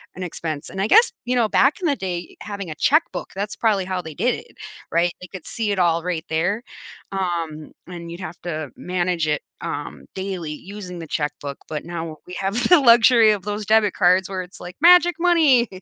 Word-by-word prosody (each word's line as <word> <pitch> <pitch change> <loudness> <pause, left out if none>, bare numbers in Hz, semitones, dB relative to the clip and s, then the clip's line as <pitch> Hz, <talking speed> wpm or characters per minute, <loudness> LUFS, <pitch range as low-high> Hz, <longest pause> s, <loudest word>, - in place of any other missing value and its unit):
an 185 - -5
expense. 160 -3 -5
And 190 - -4
I 200 - +1
guess, 455 - +6
you 250 +1 0
know, 235 -3 +3
back 280 +7 +3
in 345 - +1
the 285 - +2
day, 180 -2 -5
having 200 -4 -6
a - - -6
checkbook, 305 - +1
that's 200 +1 -3
probably 210 -4 +2
how 185 -1 -2
they 160 -2 -9
did 245 +11 +1
it, 470 - -13 0.3
right? 170 +1 +2
They 180 - -8
could 180 -1 -10
see 220 -3 -2
it 190 - -2
all 170 -2 +2
right 175 -2 -3
there, 175 +8 0 0.5
um, 170 -5 -3 0.2
and 170 -2 -8
you'd 170 - -8
have 175 0 -7
to 155 -5 -4
manage 180 -2 -1
it, 150 -1 0 0.2
um, 145 0 -6
daily 190 -5 -4
using 180 +1 -9
the 165 - -7
checkbook. 145 -2 -3
But 155 0 -4
now 165 -2 -5
we 180 - -9
have 195 +1 -2
the 355 - +8
luxury 230 -2 +6
of 205 -3 -2
those 210 +1 -4
debit 215 -1 +3
cards 185 0 +3
where 190 -1 -3
it's 180 +1 -12
like, 180 0 -8
magic 350 0 +7
money 315 -9 +4
185 Hz, 210 wpm, -22 LUFS, 170-220 Hz, 0.5 s, the